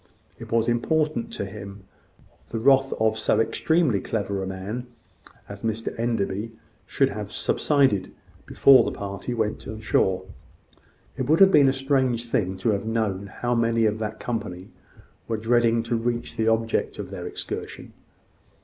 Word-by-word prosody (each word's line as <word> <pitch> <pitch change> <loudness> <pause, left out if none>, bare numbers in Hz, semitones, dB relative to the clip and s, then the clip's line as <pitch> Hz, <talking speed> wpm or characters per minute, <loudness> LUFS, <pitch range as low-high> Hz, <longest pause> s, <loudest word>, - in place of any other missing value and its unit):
It - - -10
was 115 0 +2
important 150 +2 0
to - - -3
him 100 0 -9 0.7
that - - -23
the - - -1
wrath 135 +2 +4
of 110 0 +1
so 110 - +2
extremely 125 - +2
clever 100 -2 -2
a 95 - -3
man 100 +6 -5 0.6
as - - -9
Mr 115 0 -2
Enderby 115 -2 -1 0.3
should - - +2
have - - -6
subsided 130 -11 +1 0.4
before 135 -2 +6
the - - -2
party 100 +5 -4
went 110 -2 -2
on 110 - -6
shore. 95 -4 +1 0.9
It 130 - -2
would 160 - +4
have 195 -1 +8
been 140 -5 +6
a - - +3
strange 130 -3 0
thing 95 -3 0
to 115 - +4
have 100 0 -2
known 105 -4 -1
how 120 +4 -2
many 115 -1 +2
of 110 0 0
that 110 -1 -4
company 105 -6 -5 0.6
were 115 - -1
dreading 115 +1 +2
to 115 +1 -1
reach 120 +1 -2
the 110 0 0
object 115 0 0
of - - -6
their - - -6
excursion. - - -6
115 Hz, 160 wpm, -25 LUFS, 105-120 Hz, 0.9 s, have